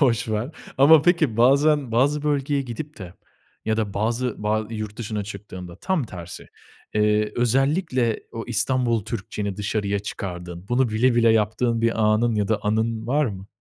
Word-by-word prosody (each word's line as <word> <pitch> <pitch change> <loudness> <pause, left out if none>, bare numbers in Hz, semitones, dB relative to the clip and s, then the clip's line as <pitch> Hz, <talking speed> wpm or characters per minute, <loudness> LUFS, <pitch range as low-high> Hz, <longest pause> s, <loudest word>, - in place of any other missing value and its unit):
Boş 120 -4 +2
ver. 110 +5 -2 0.3
Ama 145 +2 +7
peki 165 -10 +2
bazen 140 +2 +3
bazı 140 +5 +2
bölgeye 145 -1 0
gidip 145 +5 -7
de 90 -3 -9 0.5
ya 110 0 0
da 105 -3 -2
bazı 115 +2 -1
ba 110 +1 0
yurt 110 -2 -5
dışına 105 -3 -3
çıktığında 95 -4 -9
tam 180 - -1
tersi, 90 -5 -9 0.5
eee, 105 0 +2
özellikle 130 - +1
o 115 - -5
İstanbul 120 -1 +1
Türkçeni 105 -3 -4
dışarıya 105 -1 -1
çıkardığın, 90 -3 -7
bunu 125 +1 +2
bile 115 +3 +2
bile 115 -1 +4
yaptığın 115 +2 +1
bir 115 -1 +1
anın 110 +2 +3
ya 105 -2 0
da 110 -1 +1
anın 110 +1 -1
var 145 +3 +2
mı? 100 -3 -6
115 Hz, 160 wpm, -23 LUFS, 105-130 Hz, 0.5 s, Ama